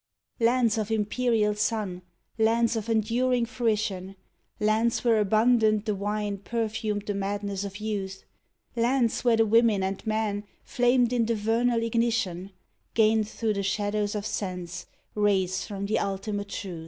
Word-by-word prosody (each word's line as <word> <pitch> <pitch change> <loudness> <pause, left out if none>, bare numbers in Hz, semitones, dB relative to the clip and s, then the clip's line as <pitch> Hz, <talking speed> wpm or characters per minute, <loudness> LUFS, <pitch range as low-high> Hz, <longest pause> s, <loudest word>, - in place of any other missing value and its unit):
Lands 230 -1 +3
of 215 0 -2
imperial 220 0 +1
sun, 210 -4 -2 0.4
lands 230 +1 +3
of 225 0 -3
enduring 235 +3 +1
fruition, 215 -5 -2 0.4
Lands 220 +2 +1
where 230 -3 +4
abundant 215 0 +3
the 215 - 0
wine 205 0 -2
perfumed 215 -1 -2
the 205 - -2
madness 200 0 -3
of 200 -1 -6
youth, 200 -3 -4 0.5
Lands 240 0 +1
where 235 -2 +4
the 225 - +4
women 220 -2 +3
and 190 0 -3
men 215 -1 -1 0.2
flamed 245 -1 +2
in 235 -2 +1
the 230 - +1
vernal 230 +2 +1
ig 230 - -3
nition, 225 -6 0 0.5
Gained 220 -1 +3
through 220 -1 -1
the 200 - -2
shadows 205 +1 -1
of 205 -1 -3
sense 180 -4 -4 0.3
rays 190 -3 +1
from 200 -1 -4
the 215 - 0
ulti 200 +1 -2
mate 205 0 -3
truth. 185 -5 -5
215 Hz, 150 wpm, -27 LUFS, 200-230 Hz, 0.5 s, where